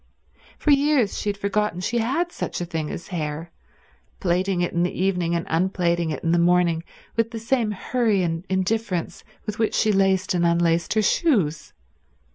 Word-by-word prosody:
For 300 - +2
years 280 -6 +3
she 210 - -2
had 200 - -2
forgotten 200 -2 -1
she 235 +6 -1
had 280 +10 0
such - - -4
a 175 - -2
thing 160 -3 -3
as - - -7
hair, 160 -1 -4 0.7
plaiting 185 +1 0
it 175 - -1
in 170 - +1
the 175 0 -1
evening 180 -3 +1
and 170 +1 -2
unplaiting 170 -1 +1
it 150 - -4
in 165 - +1
the 170 - +3
morning 170 -1 +3 0.3
with 230 0 +1
the 230 - -6
same 230 0 0
hurry 210 -1 0
and 165 0 -2
indifference 190 -1 -1 0.2
with 210 0 -5
which 220 - +1
she 215 - +3
laced 195 -2 +2
and 175 -1 +1
unlaced 170 +1 +2
her 215 - +3
shoes. 190 - +1
185 Hz, 180 wpm, -23 LUFS, 170-215 Hz, 0.7 s, years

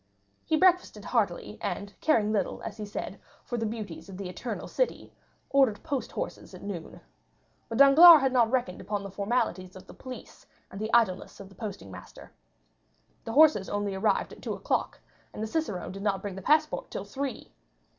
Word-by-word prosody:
He 315 - +2
breakfasted 365 +1 +2
heartily, - - -1
and 200 0 -4
caring 220 -9 +2
little, 200 -4 -1
as 205 - -6
he 210 -1 -6
said, 205 - -6 0.2
for 240 - -4
the 225 - -1
beauties 210 -5 -7
of 190 - -9
the 190 -2 -5
Eternal 215 +4 -5
City, - - -2 0.4
ordered 265 -7 +3
post 280 -5 -3
horses - - -6
at - - -12
noon. 185 -5 -7 0.7
But 225 - -3
Danglars 300 +4 +9
had 265 -1 +1
not 235 -3 +4
reckoned 240 -8 -1
upon 205 -1 -3
the 200 - -7
formalities 195 -3 -2
of 185 0 -12
the - - -13
police 255 -1 -11 0.2
and 195 - -7
the 220 +1 -3
idleness 215 -6 +1
of 195 - -10
the - - -17
posting 190 - -7
master. 90 - -12 0.9
The 225 - -4
horses 295 -9 +5
only 205 -1 -2
arrived 190 +3 0
at - - -14
two - - -3
o'clock, - - -2 0.4
and 215 - -4
the - - 0
cicerone 215 - -3
did 195 +1 -8
not 195 -2 -1
bring 200 -2 -4
the 195 - -7
passport 305 +7 +1
till 195 - -5
three. 270 +7 -5
215 Hz, 185 wpm, -28 LUFS, 195-265 Hz, 0.9 s, Danglars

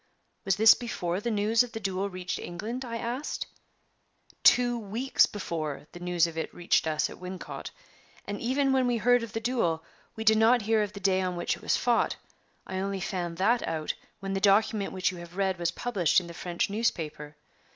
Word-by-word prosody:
"Was 195 -1 +2
this 220 +3 +8
before 180 -7 -3
the 235 - -2
news 215 +1 +3
of 245 -1 -2
the 225 - -4
duel 195 -1 -2
reached 185 0 -4
England?" 220 +9 -5
I 230 -2 -4
asked. 240 +5 -3 1.0
"Two 245 -1 +5
weeks 225 +5 +2
before 160 -8 -4
the 175 - -10
news 175 -1 +2
of 165 -1 -4
it - - -4
reached 175 -2 +2
us 155 -1 +1
at - - -11
Wincot. 180 0 -7 0.6
And 205 0 -5
even 270 +3 +1
when 260 -1 +3
we 240 -1 +1
heard 245 +2 +4
of 230 -3 -7
the 225 - -1
duel, 220 -9 0 0.3
we 220 - -4
did 220 0 +5
not 230 +1 +5
hear 220 +1 +2
of 210 -1 -2
the 200 - -7
day 190 -1 +2
on 180 -1 -2
which 175 - -1
it - - -15
was - - +1
fought. 240 -1 +2 0.5
I 190 - -4
only 195 0 -2
found 175 -3 -3
that 230 +6 +3
out 155 -1 -2 0.3
when 195 0 -3
the 195 - -1
document 205 +1 +3
which 185 0 0
you 180 - -9
have 175 +1 -11
read 190 -2 0
was 170 -1 +1
published 185 -3 +1
in 180 - -9
the 170 - -9
French 175 0 -2
newspaper. 165 -9 -2
195 Hz, 205 wpm, -28 LUFS, 175-230 Hz, 1.0 s, this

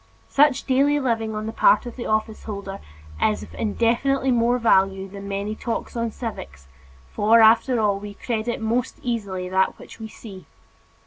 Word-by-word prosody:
Such 280 -1 +3
daily 280 +2 +2
living 225 -4 -1
on 215 0 -4
the 220 - -3
part 215 -1 +4
of 240 - -7
the 245 - -5
office 215 0 -1
holder 200 -2 -6 0.4
is 215 - +1
of - - -12
infinitely 240 +5 +1
more 240 0 +2
value 195 -4 +2
than 200 +1 -9
many 200 +1 -3
talks 230 +2 -4
on 230 -1 -1
civics 70 - -8 0.4
for, 220 +3 +4
after 230 +3 +5
all, 205 -2 +1
we 205 0 -9
credit 235 +1 -3
most 230 +3 -1
easily 200 -7 -3
that 190 +1 +1
which - - -13
we 220 - -6
see. 195 -6 -12
220 Hz, 170 wpm, -23 LUFS, 200-240 Hz, 0.4 s, after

